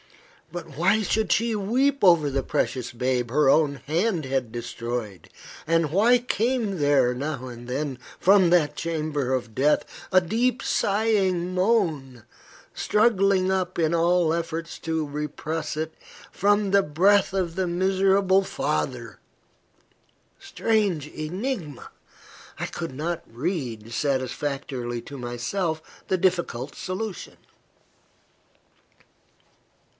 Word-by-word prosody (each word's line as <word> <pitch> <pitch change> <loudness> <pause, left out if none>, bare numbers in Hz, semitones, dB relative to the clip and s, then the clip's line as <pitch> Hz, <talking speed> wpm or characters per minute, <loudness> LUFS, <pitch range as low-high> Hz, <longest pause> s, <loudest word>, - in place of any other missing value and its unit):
But 170 -4 -8
why 195 +6 +3
should 215 -2 0
she 230 0 +2
weep 255 +7 +1
over 170 -6 +5
the 135 0 -1
precious 125 -1 -1
babe 125 0 -1
her 145 0 +4
own 150 -1 +4
hand 170 +1 0
had 130 -3 -2
destroyed? 120 -3 -5 0.4
and 165 -2 +1
why 225 +8 +5
came 235 -4 -1
there, 145 -4 +3
now 135 0 -4
and 120 0 -9
then, 135 0 -3 0.2
from 190 -2 +5
that 170 -4 +3
chamber 155 -5 -2
of 120 -4 -2
death, 145 +3 +2 0.3
a 185 - +7
deep 230 +7 0
sighing 195 -4 +1
moan, 165 - 0 0.5
struggling 195 -4 +2
up 185 -2 -1
in 160 -1 +2
spite - - -1
of 170 - +2
all 170 -1 +3
efforts 165 0 -4
to 160 -2 -2
repress 150 +2 -4
it, 160 0 -3 0.4
from 205 0 +2
the 200 0 +5
breast 190 +7 +3
of 180 -4 -2
the 190 -1 0
miserable 190 +2 +3
father? - - -3 1.2
Strange 210 - 0
enigma! 170 - -5 0.7
I - - -1
could 165 -5 -5
not 165 +5 -3
read, 120 - -4
satisfactorily 130 -1 -2
to 140 - -9
myself, 155 +7 -4
the 185 - +1
difficult 170 -8 -1
solution. 190 +1 -5
165 Hz, 120 wpm, -25 LUFS, 140-195 Hz, 1.2 s, a